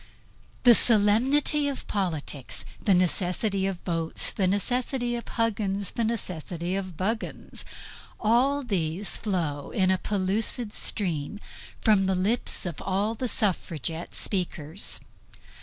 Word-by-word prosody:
The 245 -2 +9
solemnity 250 +8 +4
of 280 -2 -4
politics; 160 - -3 0.2
the 200 -4 +4
necessity 185 +2 +1
of 195 -2 -2
votes; 165 -2 -1
the 190 - +1
necessity 245 +5 0
of 235 - -6
Huggins; 205 -4 -1
the 235 - -1
necessity 180 -5 -2
of 185 -4 -4
Buggins; 220 +4 -3 0.5
all 255 +6 +3
these 190 -4 0
flow 160 -9 -2
in 190 -1 +2
a 185 - +2
pellucid 210 +3 0
stream 175 -2 -1 0.4
from 200 -3 +4
the 190 - +2
lips 200 +5 +1
of 170 -5 -4
all 200 +4 0
the 250 +3 -3
suffragette 170 - -1
speakers. 175 -2 -1
195 Hz, 120 wpm, -27 LUFS, 180-225 Hz, 0.5 s, The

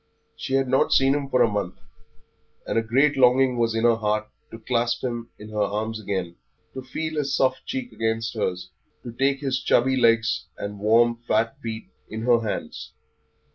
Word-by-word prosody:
She 145 -3 -3
had 135 -1 +2
not 130 +1 +2
seen 135 0 +4
him 140 -1 -2
for 130 - +4
a - - +4
month, 100 -4 -3 0.9
and - - -3
a 115 - +3
great 135 +6 +2
longing 130 0 +4
was 115 -1 +1
in 115 - 0
her 120 -1 +4
heart 105 0 -1 0.2
to - - -9
clasp 120 +1 -1
him 120 -2 -4
in 105 - -11
her 105 -1 -2
arms 110 +2 -2
again, 95 -4 -4 0.4
to 130 - -6
feel 155 +4 -4
his 140 -2 -1
soft 130 -1 +1
cheek 260 -2 -4
against 110 0 -2
hers, 90 -4 -3 0.3
to 120 - -7
take 135 +3 0
his 135 -2 -1
chubby 130 +1 +2
legs 115 -3 +2
and 100 0 -6
warm, 115 +3 +3
fat 115 +4 +1
feet 110 -2 -5 0.2
in 110 +1 -5
her 120 -1 +4
hands. 105 -8 -5
115 Hz, 185 wpm, -24 LUFS, 110-130 Hz, 0.9 s, seen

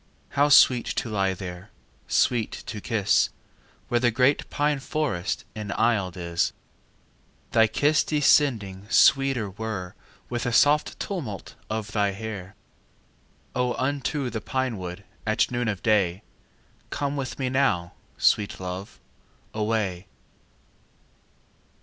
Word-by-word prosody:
How 145 +1 +2
sweet 125 -4 +6
to - - -2
lie 95 -2 +1
there, 90 +1 -8 0.4
Sweet 120 -3 +2
to 105 -3 -6
kiss, 110 -4 +2 0.6
Where 120 - +1
the 120 0 +3
great 125 +5 +2
pine 145 -1 0
forest 135 - -2
Enaisled 105 -3 0
is! 85 -1 -1 1.0
Thy 110 0 +5
kiss 145 +6 +2
descending 115 -10 +2
Sweeter 135 -5 +4
were 100 -3 -5 0.3
With 120 0 -3
a - - 0
soft 145 +5 +3
tumult 130 - -5 0.2
Of 110 -1 -3
thy 100 -2 +1
hair. 100 -2 -7 1.0
O, 125 -1 0
unto 140 -1 -1
the 110 -1 -4
pine 130 -1 -2
wood 90 +2 -6 0.2
At 110 +3 +2
noon 120 -1 -1
of 100 -4 -3
day 100 -3 +2 0.7
Come 145 0 -2
with 130 -4 -4
me 130 -2 -1
now, 100 -11 +1 0.2
Sweet 105 -1 +2
love, 95 +2 -6 0.5
away. 105 -4 -1
110 Hz, 120 wpm, -25 LUFS, 100-130 Hz, 1.0 s, sweet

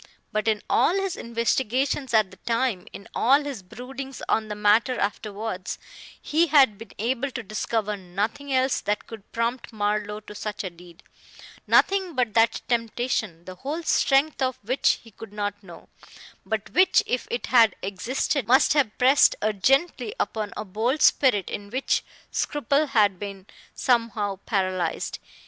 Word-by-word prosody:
But 215 +1 -1
in 215 -2 +1
all 355 - +3
his 390 -2 -1
investigations 250 +3 -1
at 215 -4 +3
the - - -14
time, 230 -5 -1
in 200 - -10
all 275 +5 +4
his 280 -7 -5
broodings 260 +7 -8
on 220 -1 +1
the 210 - -5
matter 210 +5 +3
afterwards, 200 -1 -3 0.4
he 325 +3 +1
had 270 -9 +5
been 225 - -11
able 250 +5 -1
to 255 -2 -6
discover 215 0 -2
nothing 205 +9 -4
else 260 0 +2
that 210 0 -2
could 220 -3 -12
prompt 235 +2 -2
Marlowe 210 -1 -1
to 210 - -11
such 210 0 -5
a 185 - -4
deed 170 0 -16 0.6
nothing 380 -4 +3
but 245 -4 0
that 225 0 +3
temptation, 230 -7 -1
the 185 - -7
whole 295 - -4
strength 280 -1 +2
of 260 -1 0
which 255 +6 +2
he 225 - -15
could 220 0 -11
not 205 -1 -3
know, 175 -4 -13 0.6
but 220 0 -3
which 370 +1 +4
if 250 - -2
it 240 - -2
had 230 -5 +5
existed 225 +6 -1
must 260 +5 +5
have 270 -8 +1
pressed 265 +3 +5
urgently 270 - +1
upon 215 -2 -2
a 210 - -4
bold 225 +9 0
spirit 210 -9 +4
in 200 0 -6
which 260 +5 0 0.3
scruple 290 +1 0
had 205 -8 +2
been 200 -2 -7 0.3
somehow 225 -5 0
paralyzed. 185 -5 -1
225 Hz, 155 wpm, -25 LUFS, 205-265 Hz, 0.6 s, had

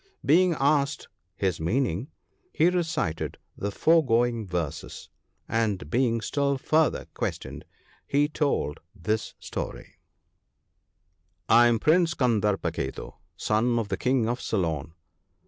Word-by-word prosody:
Being 180 +3 +5
asked 140 +1 +1 0.3
his 95 -3 -1
meaning, 115 - -1 0.4
he 165 - +3
recited 165 - -2 0.2
the 100 - -3
foregoing 120 -5 +2
verses, 85 -5 -4 0.4
and, 105 -9 -1
being 115 -1 +2
still 140 +3 0
further 155 +4 +1
questioned, - - -4 0.4
he 145 +1 +2
told 140 - -1 0.2
this 105 +3 -2
story - - -7 0.8
— - - -47 0.7
"I 120 0 +7
am 120 -1 +3
Prince 165 +6 +3
Kandarpa 105 -6 +1
ketu, - - -5 0.2
son 120 +5 +1
of 110 -3 -2
the - - -1
King 125 -3 +1
of 120 +2 -2
Ceylon. 80 -6 -2
120 Hz, 115 wpm, -26 LUFS, 100-145 Hz, 0.8 s, I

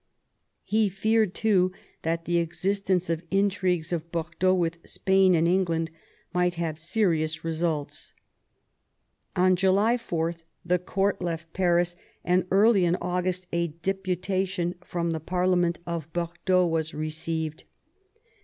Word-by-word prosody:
He 215 -1 +2
feared 215 +1 +1
too 185 -4 +3 0.3
that 165 +1 -2
the 175 0 +2
existence 185 +2 0
of 165 0 -2
intrigues 185 -4 +1
of 170 0 -4
Bordeaux 170 +3 +1
with 170 -2 -1
Spain 190 -1 +3
and 165 0 +3
England 170 -3 +1 0.4
might 180 0 +1
have 165 -2 -3
serious 165 -4 0
results. 160 -2 -3 1.2
On 185 0 +4
July 195 +6 +3
4 170 -7 -2 0.3
the 180 +1 +2
court 195 +2 0
left 165 -2 -4
Paris, 175 -1 +2 0.3
and 180 0 +2
early 200 0 +5
in 175 0 +3
August 180 +1 -2
a 170 0 +1
deputation 185 +1 -2
from 170 -2 -2
the 160 - -2
parlement 180 +1 +1
of 165 -2 -4
Bordeaux 175 +2 +1
was 160 -2 -1
received. 155 0 -3
175 Hz, 125 wpm, -26 LUFS, 165-185 Hz, 1.2 s, early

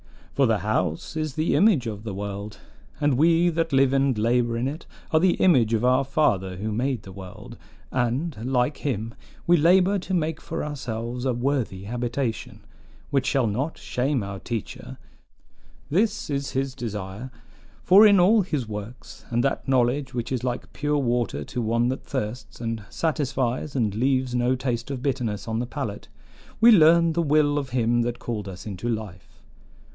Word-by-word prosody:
"For 135 -2 +3
the 110 -2 +2
house 90 - -2
is 155 -3 -3
the 155 +1 +1
image 195 - +4
of 105 -3 -5
the 105 -4 -5
world, 100 +1 -6 0.4
and 145 -2 +2
we 170 +2 +4
that 165 -1 -1
live 135 -1 +3
and 135 -3 +2
labor 115 +1 +1
in 120 +2 -1
it 155 +5 -6 0.2
are 155 - +4
the 180 +1 +3
image 120 -11 +4
of 115 +2 0
our 130 +2 +4
Father 105 -10 +1
who 110 +3 -3
made 125 +2 -1
the 95 - -10
world; 95 -1 -10 0.4
and, 130 +6 -1 0.2
like 125 +3 +1
him, 115 -5 -3 0.3
we 175 0 +5
labor 185 +5 +4
to 185 +1 -3
make 160 -2 -1
for - - -4
ourselves 125 -4 -4
a 130 - +1
worthy 120 -6 -1
habitation, 120 +2 -3 0.5
which 135 -2 +1
shall 135 -1 +2
not 125 +9 -2
shame 130 -1 -1
our 100 0 -6
teacher. 115 -1 -6 0.9
This 200 -1 0
is 140 -2 -2
his 135 0 -2
desire; 105 0 -6 0.5
for 200 +4 +8
in 200 -2 +5
all 210 +5 +5
his 150 - -2
works, 105 +2 -8
and 120 0 +1
that 140 - -1
knowledge 130 +1 +1
which 120 0 -3
is 125 -2 -2
like 125 -1 -4
pure 150 +1 0
water 120 -3 0
to 125 - -4
one 115 +2 +1
that 130 - -4
thirsts, 125 -2 -5
and 115 -1 -3
satisfies 140 -4 -1
and 110 -6 +1
leaves 130 +2 0
no 125 +1 +2
taste 125 -2 -3
of 135 -2 -5
bitterness 125 -7 -2
on 110 0 -1
the 120 - -3
palate, 125 -7 -5 0.5
we 235 +2 +8
learn 170 -3 +6
the 170 - +1
will 150 -1 +2
of 140 -2 -5
him 120 -1 +1
that 120 0 -2
called 105 -4 -5
us 90 -1 -9
into 105 +3 -4
life. 105 -5 -5
125 Hz, 175 wpm, -24 LUFS, 115-145 Hz, 0.9 s, for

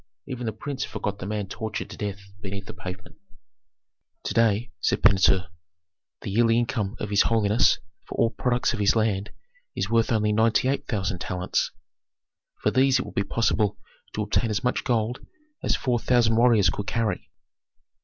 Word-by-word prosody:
Even 125 -3 -5
the - - 0
prince 135 +5 -5
forgot 100 -1 -4
the 95 - -5
man 105 -1 -2
tortured 110 +2 -5
to - - -7
death 100 -1 -4 0.2
beneath 100 0 -6
the - - -8
pavement. 90 0 -9 1.1
"To - - -3
day," 115 +1 +2
said - - 0
Pentuer, 95 -2 +4 0.7
"the - - -5
yearly 115 +2 +3
income 115 -3 -1
of 105 - -4
his 100 - +5
holiness 110 -1 +3 0.3
for - - -6
all 115 -1 +3
products 125 -1 0
of 115 - -4
his 100 +1 +3
land 110 -2 0 0.5
is 100 - -2
worth 115 +1 +3
only 105 -2 +2
ninety 115 +3 +3
eight 140 +1 -1
thousand 95 -5 -2
talents. 90 0 -1 0.9
For - - +3
these 130 +1 +4
it 125 - -2
would - - -9
be - - +1
possible 105 -1 +1 0.4
to 105 - 0
obtain 110 +2 0
as 105 +4 -1
much 125 - 0
gold 120 0 -1 0.4
as - - +1
four 125 -2 0
thousand 115 -2 +3
warriors 115 -6 +5
could 100 - -5
carry." 110 -5 -1
110 Hz, 175 wpm, -25 LUFS, 100-120 Hz, 1.1 s, his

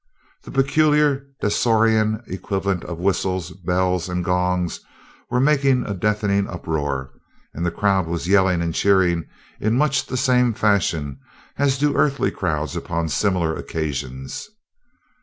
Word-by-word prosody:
The - - -10
peculiar 145 0 +2
Dasorian 110 0 +2
equivalents 95 0 -3
of 85 - -5
whistles, 90 -1 -1
bells, 90 0 -1
and 90 0 -2
gongs 90 -1 0 0.5
were 125 - +1
making 135 -2 +3
a 100 - -3
deafening 100 0 0
uproar, 70 -6 -3 0.4
and 85 - -4
the 85 - +1
crowd 95 0 +1
was 85 0 -3
yelling 95 -3 +3
and 85 -1 -2
cheering 90 -4 +2 0.3
in 110 +3 +1
much 140 -2 +1
the 130 - -3
same 125 -3 +2
fashion 85 -10 0 0.4
as 140 -1 +2
do 145 +1 +1
earthly 140 -1 +2
crowds 75 -2 -2
upon 80 -1 -2
similar 85 -2 0
occasions. 70 - -5
95 Hz, 130 wpm, -22 LUFS, 85-120 Hz, 0.5 s, making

